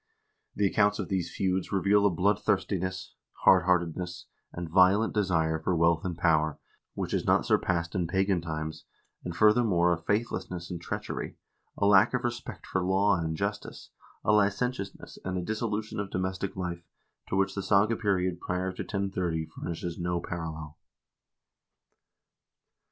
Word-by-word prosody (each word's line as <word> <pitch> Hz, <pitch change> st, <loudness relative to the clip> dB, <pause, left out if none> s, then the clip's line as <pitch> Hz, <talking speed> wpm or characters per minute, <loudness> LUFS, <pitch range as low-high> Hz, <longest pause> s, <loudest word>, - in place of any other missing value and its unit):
The 100 Hz, -, +1 dB
accounts 105 Hz, +1 st, +3 dB
of -, -, -4 dB
these 90 Hz, -4 st, -1 dB
feuds 95 Hz, -1 st, -1 dB
reveal 100 Hz, +1 st, +3 dB
a -, -, +3 dB
bloodthirstiness, 95 Hz, 0 st, 0 dB, 0.3 s
hardheartedness, 90 Hz, -1 st, +3 dB, 0.3 s
and 85 Hz, -1 st, -5 dB
violent 95 Hz, +6 st, +4 dB
desire 80 Hz, -6 st, +1 dB
for 85 Hz, +3 st, 0 dB
wealth 85 Hz, 0 st, +3 dB
and 90 Hz, -3 st, -3 dB
power 80 Hz, -3 st, +2 dB, 0.4 s
which -, -, -3 dB
is -, -, +1 dB
not -, -, +3 dB
surpassed 85 Hz, -2 st, +1 dB
in 90 Hz, -3 st, 0 dB
pagan 95 Hz, 0 st, +1 dB
times, 80 Hz, -1 st, -5 dB, 0.4 s
and 85 Hz, -1 st, -5 dB
furthermore 105 Hz, -5 st, +4 dB
a -, -, -1 dB
faithlessness 90 Hz, -3 st, -2 dB
and 85 Hz, -1 st, -5 dB
treachery, -, -, -5 dB, 0.4 s
a -, -, +1 dB
lack 100 Hz, +4 st, +5 dB
of 125 Hz, -, -2 dB
respect 120 Hz, 0 st, -5 dB
for 95 Hz, -, -1 dB
law 95 Hz, +2 st, +3 dB
and 80 Hz, -1 st, -2 dB
justice, 100 Hz, +3 st, -4 dB, 0.3 s
a -, -, +4 dB
licentiousness, 105 Hz, +1 st, 0 dB
and 95 Hz, 0 st, -3 dB
a 90 Hz, -, -2 dB
dissolution 110 Hz, +1 st, -3 dB
of 100 Hz, -1 st, -3 dB
domestic 95 Hz, +1 st, -3 dB
life, 85 Hz, -2 st, -4 dB, 0.5 s
to -, -, -1 dB
which 95 Hz, 0 st, +1 dB
the 100 Hz, -, -3 dB
saga 105 Hz, +3 st, +3 dB
period 95 Hz, -5 st, 0 dB
prior 90 Hz, +1 st, -2 dB
to -, -, -6 dB
1030 95 Hz, -5 st, -2 dB
furnishes 85 Hz, +1 st, -6 dB
no 90 Hz, 0 st, -1 dB
parallel." 80 Hz, -3 st, -6 dB
95 Hz, 145 wpm, -28 LUFS, 85-100 Hz, 0.5 s, lack